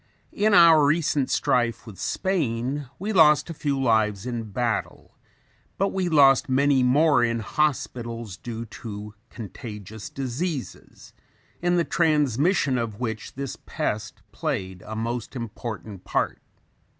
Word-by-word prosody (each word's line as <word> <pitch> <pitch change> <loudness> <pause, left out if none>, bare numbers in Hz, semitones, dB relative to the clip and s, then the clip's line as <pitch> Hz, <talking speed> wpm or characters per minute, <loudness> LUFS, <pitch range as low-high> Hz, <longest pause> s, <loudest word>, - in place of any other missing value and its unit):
In 210 0 +3
our 165 -4 +8
recent 145 -2 +2
strife 120 -2 +1
with 105 -5 -11
Spain 140 - -1
we 210 +4 -3
lost 160 -2 +5
a - - -4
few 145 -3 -2
lives 110 -5 +1
in 120 -2 -3
battle, 115 +1 -3 0.6
but 195 +1 +1
we 185 -2 -1
lost 140 -4 +5
many 135 +1 +3
more 140 +1 +4
in 115 -1 +1
hospitals 115 -5 -2
due 115 +5 -6
to 105 -2 -8 0.2
contagious 105 -2 -8
diseases, 135 +3 -5 0.5
in 175 0 +2
the 170 - +3
transmission 145 - +2
of 110 -3 -4
which 110 -4 -4
this 135 0 -5
pest - - -3
played 95 -1 -3
a 110 - -5
most 115 +3 -4
important 110 -4 -6
part. - - -1
125 Hz, 125 wpm, -25 LUFS, 115-150 Hz, 0.6 s, our